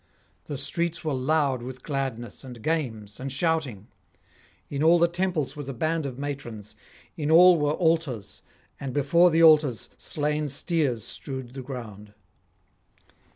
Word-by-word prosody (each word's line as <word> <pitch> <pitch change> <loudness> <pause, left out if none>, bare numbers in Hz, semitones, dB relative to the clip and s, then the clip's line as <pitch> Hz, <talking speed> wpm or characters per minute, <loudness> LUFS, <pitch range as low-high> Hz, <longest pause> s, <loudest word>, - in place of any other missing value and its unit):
The 145 - -5
streets 170 +4 -2
were 155 - 0
loud 135 -1 +1
with 130 +1 -8
gladness 130 -6 -4
and 125 -4 -10
games 115 -11 -2
and 135 +1 -4
shouting. 140 - -1 0.8
In 140 0 -4
all 165 +2 +6
the 170 0 +4
temples 175 -5 -2
was 145 -2 -7
a 135 - -5
band 155 +3 -1
of 125 -2 -7
matrons, 120 -7 -6 0.4
in 150 -2 -2
all 175 +1 +7
were 150 0 +1
altars, 160 - -1 0.4
and 135 -2 -5
before 170 +5 +4
the 165 0 +3
altars 145 -7 +5
slain 150 0 -1
steers 140 - 0
strewed 130 +1 -6
the 135 - -6
ground. 110 -6 -9
140 Hz, 145 wpm, -26 LUFS, 125-160 Hz, 0.8 s, all